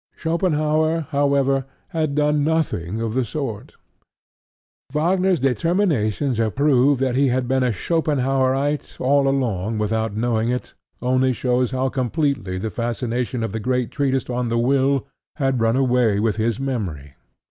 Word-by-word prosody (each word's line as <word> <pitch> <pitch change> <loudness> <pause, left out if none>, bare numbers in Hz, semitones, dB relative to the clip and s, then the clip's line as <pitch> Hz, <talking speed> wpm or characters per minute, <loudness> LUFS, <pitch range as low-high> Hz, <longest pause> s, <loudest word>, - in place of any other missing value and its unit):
Schopenhaur, 160 -1 +1
however, 140 -2 +2 0.2
had 160 -5 -1
done 150 0 +2
nothing 140 - -1
of 110 -1 -2
the 130 +1 +1
sort. 115 -4 -5 1.2
Wagner's 180 +4 +2
determination 135 - +1
to 115 -1 +1
prove 140 +1 +3
that 130 -1 0
he 140 +1 +3
had 125 0 0
been 130 +1 +1
a 125 -1 +2
Schopenhaurite 135 - 0
all 140 +1 +3
along 115 -6 0
without 110 0 -1
knowing 115 0 0
it 125 0 -3 0.3
only 130 +1 +2
shows 125 0 0
how 130 0 -1
completely 130 - -1
the 110 +3 -3
fascination 120 +1 -2
of 110 - -2
the 110 - -3
great 125 +1 -1
treatise 135 -3 0
on 125 0 -2
The 115 0 0
Will 135 +3 +2 0.3
had 135 -5 0
run 115 +1 +2
away 125 -5 +2
with 110 -1 0
his 115 +1 0
memory. 95 - -4
130 Hz, 145 wpm, -21 LUFS, 115-145 Hz, 1.2 s, prove